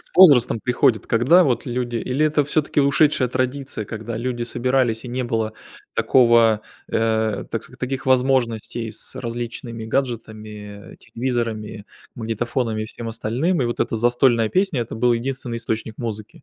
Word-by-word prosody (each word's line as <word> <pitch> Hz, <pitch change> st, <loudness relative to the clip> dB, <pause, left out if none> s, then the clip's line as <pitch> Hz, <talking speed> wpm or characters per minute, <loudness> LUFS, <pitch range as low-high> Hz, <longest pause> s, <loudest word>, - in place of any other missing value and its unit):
с -, -, -9 dB
возрастом 140 Hz, -11 st, +7 dB
приходит, 125 Hz, -3 st, +2 dB
когда 135 Hz, +11 st, +5 dB
вот 125 Hz, -1 st, 0 dB
люди 120 Hz, -1 st, -2 dB
или 130 Hz, +6 st, 0 dB
это 150 Hz, -1 st, +2 dB
все-таки 150 Hz, 0 st, +1 dB
ушедшая 140 Hz, -2 st, +3 dB
традиция, 130 Hz, -2 st, -2 dB
когда 110 Hz, +1 st, -6 dB
люди 120 Hz, 0 st, -3 dB
собирались, 120 Hz, -1 st, 0 dB
и -, -, -6 dB
не 125 Hz, +1 st, -2 dB
было 115 Hz, -3 st, -1 dB, 0.4 s
такого, 115 Hz, -4 st, +4 dB, 0.3 s
э, 110 Hz, -2 st, 0 dB
так 115 Hz, -, -3 dB
ск 125 Hz, -, -12 dB
таких 130 Hz, +1 st, -3 dB
возможностей 120 Hz, -3 st, +1 dB
с 105 Hz, -, -6 dB
различными 115 Hz, -1 st, -5 dB
гаджетами, 110 Hz, -4 st, -5 dB
э -, -, -17 dB
телевизорами, 115 Hz, -4 st, -3 dB, 0.3 s
магнитофонами, 115 Hz, 0 st, -2 dB
и -, -, -3 dB
всем 115 Hz, +1 st, -7 dB
остальным. 125 Hz, +9 st, 0 dB
И -, -, 0 dB
вот 120 Hz, -, -3 dB
эта -, -, 0 dB
застольная 120 Hz, -1 st, +3 dB
песня- 185 Hz, -, +1 dB
это 110 Hz, -1 st, -5 dB
был 120 Hz, +1 st, +3 dB
единственный 120 Hz, -1 st, -3 dB
источник 110 Hz, -1 st, -4 dB
музыки. 110 Hz, +1 st, -6 dB
120 Hz, 155 wpm, -22 LUFS, 110-130 Hz, 0.4 s, возрастом